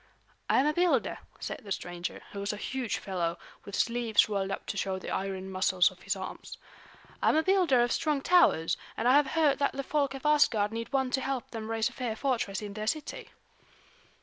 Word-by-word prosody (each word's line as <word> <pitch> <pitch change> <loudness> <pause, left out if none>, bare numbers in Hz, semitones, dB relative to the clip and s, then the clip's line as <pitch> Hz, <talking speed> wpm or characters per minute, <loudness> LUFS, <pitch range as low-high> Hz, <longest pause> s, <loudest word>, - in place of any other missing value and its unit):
"I - - +4
am 270 - +3
a 300 - +2
builder," 350 +2 +1 0.2
said - - -5
the 200 - -10
stranger, 175 -1 -4
who 200 - -6
was 200 +1 -1
a 210 - -5
huge 255 +1 -2
fellow 175 -3 -2 0.3
with 200 - -6
sleeves 235 -2 +2
rolled 200 -2 -1
up 195 - -4
to - - -4
show 195 -1 -1
the 190 - -6
iron 190 0 -3
muscles 185 -1 +3
of 185 0 -18
his 195 +1 -1
arms. 190 -1 -7 0.6
"I - - +4
am - - +3
a 315 - +3
builder 355 -9 +4
of 240 - 0
strong 300 -3 +1
towers, 335 - +4 0.2
and 230 - 0
I 250 - +6
have 290 0 +5
heard 300 -1 +2
that 280 - +1
the 275 - -3
folk 280 -1 0
of 270 - -9
Asgard 240 -9 +3
need 230 +2 -5
one 265 -2 +1
to 265 - +1
help 265 -3 -3
them 220 -1 -6
raise 225 -1 +1
a - - -7
fair 240 -3 -3
fortress 225 -6 -1
in 205 -1 -6
their 215 +1 -5
city." 310 +4 -3
225 Hz, 220 wpm, -29 LUFS, 195-275 Hz, 0.6 s, I